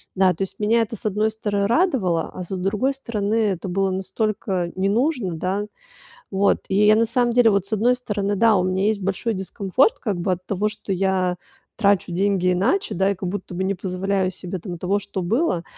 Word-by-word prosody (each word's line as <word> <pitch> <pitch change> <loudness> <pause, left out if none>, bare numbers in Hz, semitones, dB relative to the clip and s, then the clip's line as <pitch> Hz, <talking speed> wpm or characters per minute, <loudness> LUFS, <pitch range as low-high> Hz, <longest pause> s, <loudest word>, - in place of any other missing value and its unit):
Да, 185 -1 +4
то 165 - -10
есть 190 - -4
меня 225 +2 +3
это, 225 +1 -3
с 215 - -10
одной 215 +1 +1
стороны 205 -2 -1
радовало, 230 - +1
а - - -6
с - - -10
другой 210 +9 0
стороны, 220 -5 -2
это 195 -4 0
было 195 +1 0
настолько 190 -2 -2
не 190 +1 +1
нужно, 240 - 0
да. 190 +5 -2 0.7
Вот 195 +1 +2
и 200 +2 +3
я 215 0 +6
на 230 0 +3
самом 240 0 +1
деле, 240 -1 +5
вот 200 -2 +1
с 200 - -11
одной 235 +4 +3
стороны, 205 -5 -2
да, 225 0 +4
у 180 - +2
меня 185 +1 0
есть 215 -1 +1
большой 195 +4 -1
дискомфорт 200 - +1
как 205 -6 -2
бы 185 +1 0
от 180 +1 -4
того, 205 +2 0
что 210 -2 -6
я 185 -1 +1 0.4
трачу 200 -4 +2
деньги 185 -1 +1
иначе, 380 - 0
да, 190 +2 +2
и - - -4
как 185 0 -6
будто 185 -1 -5
бы 190 +2 -2
не 195 +1 0
позволяю 190 +1 -1
себе 185 0 -6
там 175 0 -6
того, 195 +4 0
что 200 -1 -5
было. 190 - 0
200 Hz, 215 wpm, -22 LUFS, 185-220 Hz, 0.7 s, я